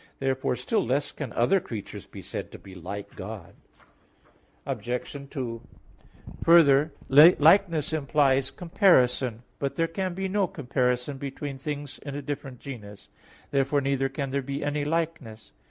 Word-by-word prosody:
Therefore 130 -1 0
still 125 +1 0
less 135 +4 0
can 140 -6 -6
other 120 +12 +3
creatures 110 - -8
be - - -10
said - - -5
to - - -7
be 95 - -13
like 95 +3 -7
God. - - -8 1.1
Obj. 125 0 -4
2: 120 -5 -4 0.8
Further, 155 -3 +6 0.2
likeness 160 +2 +6
implies 140 -3 +2
comparison. 130 - +2 0.2
But 140 -1 -2
there 165 - +2
can 185 +2 -3
be 190 +1 -2
no 195 0 +1
comparison 125 -1 -1
between 140 0 -5
things 145 -1 -5
in 140 -1 -7
a 145 - -4
different 135 -3 -6
genus. 105 -7 -10 0.4
Therefore 140 +1 +2
neither 135 -1 0
can 135 0 -4
there 140 +1 0
be 140 +2 -4
any 145 0 -1
likeness. 150 -8 -3
140 Hz, 140 wpm, -27 LUFS, 125-150 Hz, 1.1 s, Further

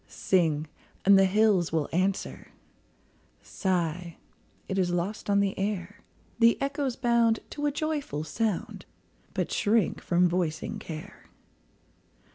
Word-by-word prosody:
Sing, 160 -5 +1 0.4
and 200 +1 +7
the 195 0 +6
hills 195 -3 +3
will 160 -2 0
answer; 190 +3 -1 1.0
Sigh, 175 -3 -2 0.5
it 195 - -1
is 180 -1 +2
lost 175 +5 -3
on 200 0 +4
the 200 -1 0
air; 205 0 -3 0.4
The 230 0 +5
echoes 275 -2 -1
bound 235 -3 +2
to 295 0 -2
a - - +1
joyful 290 - -2
sound, 215 +3 -3 0.5
But - - -1
shrink 215 -2 +1
from 180 0 +3
voicing 175 +4 -2
care. 160 -6 -9
195 Hz, 120 wpm, -28 LUFS, 175-225 Hz, 1.0 s, and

